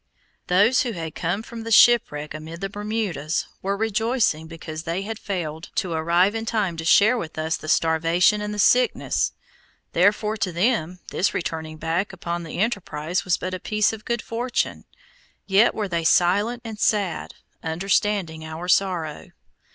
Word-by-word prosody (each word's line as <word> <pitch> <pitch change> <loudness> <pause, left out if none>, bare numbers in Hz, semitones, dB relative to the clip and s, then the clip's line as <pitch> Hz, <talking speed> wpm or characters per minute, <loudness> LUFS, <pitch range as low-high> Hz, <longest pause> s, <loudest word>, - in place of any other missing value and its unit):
Those 205 +9 +4
who 245 -5 -2
had 165 -4 -5
come 180 +6 -2
from 230 0 -8
the 225 - -6
shipwreck 210 -11 +4
amid 160 +2 -8
the 195 - -2
Bermudas, 205 -7 -2 0.2
were 200 +1 -1
rejoicing 220 -6 0
because 160 -1 -7
they 170 +4 -3
had 220 +1 -5
failed 165 -5 -4
to 180 - -1
arrive 170 +5 +2
in 225 0 -3
time 205 -7 0
to 165 - -4
share 215 +8 +5
with 160 -5 -7
us 160 +1 0
the 155 - -7
starvation 165 +6 +3
and 210 0 -3
the 210 - -5
sickness, 250 +5 +2 0.6
therefore 210 +4 +2
to 190 -3 -1
them 180 -2 0
this 195 - +1
turning 160 -1 -5
back 170 +6 -2
upon 175 -2 -4
the 165 -2 -7
enterprise 180 -6 -1
was 185 - +2
but 185 0 -4
a 185 - -3
piece 210 +3 +1
of 215 -1 -8
good 235 -1 -2
fortune. 240 +2 -2 0.6
Yet 200 +4 +4
were 210 -2 -2
they 170 -2 -2
silent 205 +9 +2
and 220 -2 -7
sad, 200 -7 0 0.3
understanding 175 0 0
our 160 +2 -6
sorrow. 180 -5 0
185 Hz, 165 wpm, -23 LUFS, 165-215 Hz, 0.6 s, share